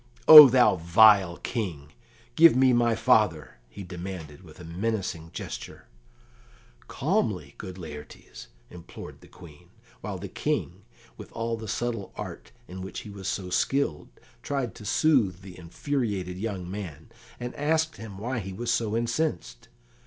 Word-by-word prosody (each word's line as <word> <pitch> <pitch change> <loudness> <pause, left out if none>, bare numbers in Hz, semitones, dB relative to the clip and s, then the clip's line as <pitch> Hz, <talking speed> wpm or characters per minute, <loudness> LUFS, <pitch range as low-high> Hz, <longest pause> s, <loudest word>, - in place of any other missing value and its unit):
"O 150 -3 +13
thou 125 -6 +4
vile 90 +1 +5
King, 80 - -5 0.4
give 165 0 +7
me 130 0 +4
my 120 -1 +2
father!" 105 - +1
he 95 - -10
demanded, 90 -3 -8
with 85 0 -14
menacing 90 -2 -4
gesture. - - -8 1.0
"Calmly, - - -2
good 95 -1 -8
Laertes," 75 -7 -11 0.2
implored 85 -2 -11
the - - -16
Queen, 75 -4 -16 0.3
while - - -6
the - - -7
King, - - -3 0.4
with - - -11
all 115 0 -3
the 110 -1 -9
subtle 115 -1 -4
art - - -8 0.2
in 95 +1 -9
which 95 - -7
he 105 - -11
was 100 -2 -8
so 90 -2 -4
skilled, 135 - -1 0.3
tried 135 -4 -3
to 105 - -12
soothe 110 - +1
the 95 -1 -12
infuriated 95 - -4
young 100 -4 -5
man, 90 -3 -8 0.3
and 120 0 -6
asked 160 +2 -1
him 105 -2 -10
why 120 +4 -4
he 95 -2 -7
was 120 +4 -3
so 115 -1 -1
incensed. 120 0 -3
100 Hz, 145 wpm, -26 LUFS, 90-120 Hz, 1.0 s, O